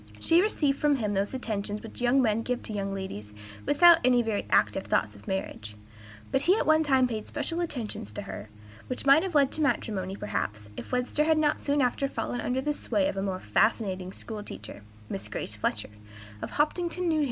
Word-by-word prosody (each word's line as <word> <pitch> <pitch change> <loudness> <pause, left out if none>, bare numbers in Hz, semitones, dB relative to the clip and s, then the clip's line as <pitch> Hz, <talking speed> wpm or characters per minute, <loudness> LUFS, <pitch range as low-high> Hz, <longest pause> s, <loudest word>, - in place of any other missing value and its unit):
She 335 +2 +4
received 295 -9 +1
from 295 -1 +3
him 215 -5 -1
those 200 +5 -1
attentions 210 -4 -3
which 225 - -7
young 250 +2 +4
men 220 -1 +2
give 250 +1 -2
to 215 - -5
young 195 -1 -2
ladies 150 - -6 0.3
without 340 +2 +7
any 245 -1 +4
very 220 -2 -2
active - - +2
thoughts - - +1
of - - -16
marriage; 110 - -4 0.6
but 270 - +2
he 370 +7 +4
at - - 0
one 315 +1 +5
time 265 -4 +3
paid 220 -3 -5
special 335 - -3
attentions 235 - -4
to - - -5
her, 100 +2 -8 0.4
which 255 - -3
might 280 +3 +7
have 370 -3 -4
led 280 -2 +4
to 315 - -2
matrimony, 195 -9 0
perhaps, 105 - -4
if - - -8
Webster 250 +4 +1
had 320 0 +3
not 300 -1 +2
soon 285 -1 +1
after 250 +2 +1
fallen 245 -2 -3
under 255 +1 -1
the 295 +2 0
sway 205 -8 0
of - - -2
a 195 - -2
more 190 -1 -2
fascinating 185 - +1
school 215 +1 -7
teacher, 205 - -8 0.3
Miss 100 +1 -5
Grace 105 - -4
Fletcher, 105 0 -2 0.5
of - - -4
Hopkinton, 345 +4 0
N. 345 - +2
H. 315 - +2
240 Hz, 210 wpm, -28 LUFS, 195-290 Hz, 0.6 s, without